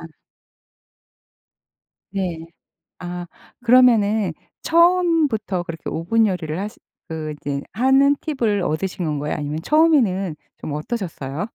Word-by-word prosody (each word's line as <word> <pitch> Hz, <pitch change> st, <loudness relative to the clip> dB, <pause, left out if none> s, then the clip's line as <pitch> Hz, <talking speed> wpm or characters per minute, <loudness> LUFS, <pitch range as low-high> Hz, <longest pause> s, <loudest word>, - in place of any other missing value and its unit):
아. 165 Hz, -, -8 dB, 2.1 s
네. 185 Hz, -4 st, -1 dB, 0.6 s
아 175 Hz, 0 st, -6 dB, 0.4 s
그러면은 220 Hz, -6 st, +4 dB, 0.3 s
처음부터 330 Hz, -, +3 dB
그렇게 165 Hz, -2 st, -7 dB
오븐 220 Hz, +8 st, +2 dB
요리를 170 Hz, -5 st, -2 dB
하시 205 Hz, +2 st, -5 dB, 0.3 s
그 155 Hz, -1 st, -4 dB
이제 140 Hz, -1 st, -3 dB
하는 270 Hz, +5 st, +4 dB
팁을 235 Hz, -10 st, 0 dB
얻으신 180 Hz, +3 st, -2 dB
건가요? 150 Hz, 0 st, -2 dB
아니면 150 Hz, +1 st, -3 dB
처음에는 225 Hz, -, +3 dB, 0.2 s
좀 155 Hz, -, -6 dB
어떠셨어요? 165 Hz, -, -4 dB
195 Hz, 245 characters per minute, -21 LUFS, 160-250 Hz, 2.1 s, 그러면은